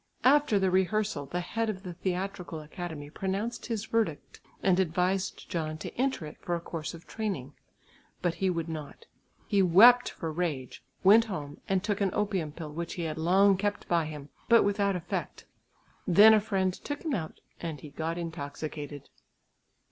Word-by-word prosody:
After 280 -4 +5
the 190 -1 +2
rehearsal 190 -4 +1
the 175 +5 -2
head 225 +5 -2
of 190 -3 -4
the 180 -2 -6
theatrical 180 -1 -3
academy 155 -1 -7
pronounced 195 +7 -3
his 225 -3 -2
verdict 220 -10 -2 0.2
and 190 -1 +4
advised 185 +2 0
John 155 -2 -3
to - - -7
enter 260 - 0
it 150 - -10
for 175 - -1
a - - -2
course 165 0 -5
of 165 - -13
training, 190 - -4 0.7
but 175 -2 0
he 185 +3 0
would 170 -2 -2
not. 160 - -7 0.4
He 200 -2 +2
wept 225 +8 +7
for 165 - -5
rage, 150 -7 -3 0.2
went 215 +4 +7
home 150 -7 -6
and 190 -1 +1
took 205 -1 -1
an 195 - +3
opium 195 -7 -1
pill 155 0 -7
which 170 +2 -4
he 175 - -3
had 160 -1 -3
long 190 +4 +4
kept 205 +1 -2
by 170 -2 +2
him, 150 -2 -8 0.2
but 230 -1 +7
without 200 -1 +1
effect; 175 -1 -4 0.6
then 205 +5 +8
a 215 - +5
friend 190 -3 0
took 290 +9 -6
him 310 - 0
out 160 -8 -4 0.2
and 160 -5 -5
he 150 - -10
got 160 +3 -3
intoxicated. 150 -3 -6
180 Hz, 175 wpm, -29 LUFS, 160-205 Hz, 0.7 s, then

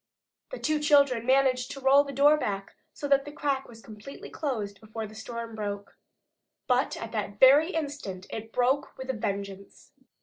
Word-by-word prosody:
The - - -6
two 310 -1 0
children 280 -5 +3
managed 260 -1 +3
to 275 - -7
roll 270 +1 +5
the 280 - -7
door 285 +3 +5
back 200 -9 -3 0.2
so 290 - -5
that 275 -1 +4
the 290 - -9
crack 280 -2 -2
was 225 -1 -14
completely 215 +5 -11
closed 210 -9 -4
before 220 0 -6
the 215 - -11
storm 230 +1 -7
broke. 205 -2 -5 0.7
But 250 +1 +1
at 230 - -7
that 205 -2 -4
very 285 +5 +7
instant 280 - -4
it 225 0 -6
broke 255 +4 0
with 260 0 -3
a - - -6
vengeance. 200 -3 -6
250 Hz, 175 wpm, -28 LUFS, 215-280 Hz, 0.7 s, very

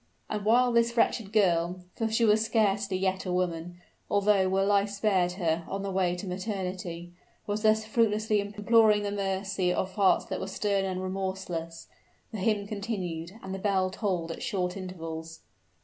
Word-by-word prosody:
And 210 -1 -2
while 245 +3 +4
this 235 0 +2
wretched 225 -3 +2
girl 180 -4 +2
for 225 -1 -1
she 230 +1 +3
was 215 0 +4
scarcely 205 -3 +1
yet 190 0 0
a - - -1
woman, 175 -1 -2 0.3
although 200 -2 +3
were 195 +1 +2
life 200 0 +3
spared 195 -3 +1
her, 170 -3 -1
on 195 0 -4
the 200 - -3
way 185 -2 +1
to 180 - -6
maternity 180 -3 -4 0.3
was 205 +1 -2
thus 220 0 +3
fruitlessly 215 -1 +2
imploring 210 +1 +3
the 205 - -2
mercy 195 -2 -1
of 185 +1 -2
hearts 195 -2 +3
that - - -4
were 190 - -4
stern 195 0 0
and 185 -1 -3
remorseless, 185 -3 -4 0.4
the 220 - -5
hymn 210 0 +1
continued, 195 -5 -4
and 190 - -5
the 195 - -4
bell 190 -2 +1
tolled 185 -5 -2
at - - -7
short 185 -8 -1
intervals. 165 -4 -7
195 Hz, 170 wpm, -28 LUFS, 180-210 Hz, 0.4 s, while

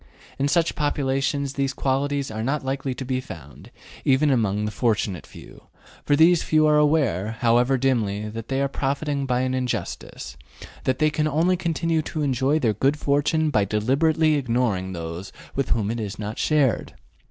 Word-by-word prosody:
In 140 - +2
such 165 +2 +2
populations 140 -1 -1
these 140 -1 -1
qualities 140 0 -1
are 110 0 -4
not 135 +4 -1
likely 135 -1 -2
to 130 - -6
be 130 0 -1
found, 80 - -11 0.3
even 140 +2 +3
among 105 -4 +1
the 105 - -2
fortunate 105 -5 -1
few, - - -14 0.4
for 145 - +2
these 165 +2 +5
few 155 -1 +3
are 150 0 +4
aware, 135 - +1
however 120 +3 +3
dimly, 110 -6 0
that 115 +1 -7
they 135 +1 0
are - - +2
profiting 140 +1 -2
by 125 -1 +1
an 130 0 -1
injustice, 125 - -4 0.3
and - - -11 0.2
that 130 -1 +1
they 155 +2 +2
can 155 0 0
only 165 +5 +2
continue 165 -2 0
to 155 0 -4
enjoy 135 +2 +1
their 115 -8 +1
good 135 +8 +1
fortune 150 +2 +1
by 105 - +3
deliberately 140 - +2
ignoring 115 -8 -1
those 85 +2 -6 0.2
with 135 -2 -2
whom 110 -2 0
it 120 - -3
is 105 -2 -5
not 105 +2 -5
shared. 145 -7 +1
135 Hz, 175 wpm, -24 LUFS, 110-150 Hz, 0.4 s, these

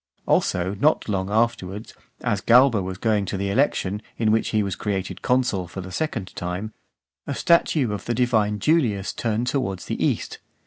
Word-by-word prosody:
Also 90 +2 +1
not 155 +5 +2
long 95 -2 -1
afterwards, 105 -2 -1 0.3
as 105 -5 0
Galba 120 0 +5
was 95 0 -5
going 105 -1 +1
to 95 - -3
the 100 +1 -1
election, 105 -5 +1 0.2
in 110 -2 +2
which 110 +1 +2
he 110 -1 +1
was 100 -2 -3
created 95 -3 -3
consul 120 -8 +1
for 95 - -7
the 95 0 -9
second 115 -8 -3
time, 90 +5 -4 0.5
a - - -2
statue 155 -7 +3
of 105 - -6
the 120 - -1
Divine 110 -4 +2
Julius 110 - +1
turned 115 +1 -1
towards 125 -8 -2
the - - -3
east. - - -1
105 Hz, 175 wpm, -23 LUFS, 95-120 Hz, 0.5 s, Galba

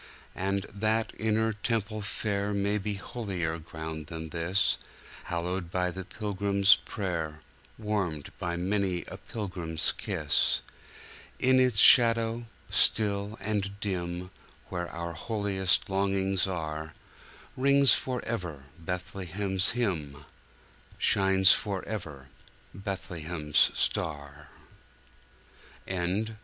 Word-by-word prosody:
And 100 +1 -1
that 110 +2 0
inner 110 0 +1
temple 110 0 -2
fair 100 0 -2
May 100 +1 0
be 105 +1 -3
holier 95 -6 -3
ground 80 -1 -7
than 80 0 -6
this, 85 +5 +1 0.5
Hallowed 85 +1 -2
by 90 0 0
the 95 +2 -6
pilgrim's 100 0 +3
prayer, 80 -6 -3 0.4
Warmed 100 -9 -2
by 85 -1 -2
many 95 0 -1
a - - -9
pilgrim's 90 -7 -2
kiss.In 130 0 -1
its 125 -5 +4
shadow 115 0 +6 0.2
still 105 0 +4
and 100 -1 -2
dim, 90 -2 -3 0.4
Where 85 -1 -3
our 85 0 -5
holiest 100 -1 0
longings 95 -1 +1
are, 80 -3 -4 0.6
Rings 140 +1 +5
forever 100 - -3 0.2
Bethlehem's 95 +2 -2
hymn, 75 - -2 0.7
Shines 95 0 +5
forever 90 -9 -2 0.4
Bethlehem's 85 -5 0
star. 75 -1 -2
95 Hz, 90 wpm, -29 LUFS, 85-105 Hz, 0.7 s, shadow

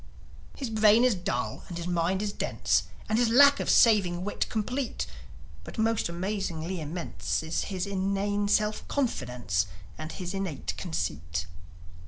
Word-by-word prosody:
His 260 -5 -4
brain 220 +1 +5
is 250 -2 +5
dull, 125 - -3
and 175 - -6
his 170 - -4
mind 180 +3 0
is 205 -1 -2
dense, - - +1 0.2
And 220 +1 +2
his 240 -2 +3
lack 280 +4 +7
of - - -2
saving 190 -7 +5
wit 205 - -2
complete; 250 +4 -2 0.6
But - - -10
most 225 -4 +1
amazingly 180 -2 -3
immense 160 +1 -3
Is 160 +1 -1
his 185 -3 -2
inane 200 +1 0
self 210 +1 +1
confidence 125 - -1 0.3
And 155 0 -5
his 180 -1 -5
innate 195 -6 -3
conceit. 80 0 -3
190 Hz, 145 wpm, -28 LUFS, 165-215 Hz, 0.6 s, lack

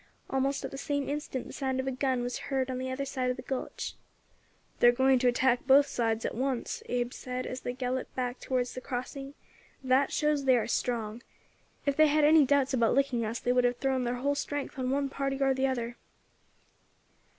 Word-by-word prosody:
Almost 270 +1 0
at - - -5
the 275 - -6
same 285 -1 -2
instant 285 -3 -3
the - - -10
sound 265 -1 -2
of 260 - -1
a 265 - -1
gun 260 -1 0
was 245 0 -3
heard 265 -1 0
on 255 - -3
the 260 0 -3
other 265 +2 -3
side 260 -2 -2
of 250 - 0
the 255 - -7
gulch. 260 0 -4 0.9
"They - - +6
are - - +9
going 260 +1 +3
to 250 - +2
attack 245 +1 +2
both 280 +1 +7
sides 225 -4 -1
at - - -2
once," 255 0 -2
Abe 245 0 -1
said, 255 0 -5
as 255 - -5
they 245 - -3
galloped 255 0 -3
back 250 -1 -2
towards 250 -1 -1
the 255 - -6
crossing; 270 +3 -5 0.5
"that 260 +1 +3
shows 300 -2 +1
they 260 -2 +5
are 230 - 0
strong. 230 -2 -2 0.6
If 280 -1 0
they 310 0 +7
had 300 +1 +3
any 305 0 +7
doubts 280 -1 +2
about 235 -3 +3
licking 265 -4 +1
us 225 +2 -3
they 245 - 0
would 250 0 +3
have 245 0 +2
thrown 265 -2 0
thar 245 0 -1
whole 280 +3 0
strength 285 -1 -4
on 255 0 -1
one 280 +1 +1
party 275 0 -2
or 270 -1 +3
the 265 +1 +1
other." 240 -2 -3
260 Hz, 215 wpm, -29 LUFS, 245-275 Hz, 0.9 s, are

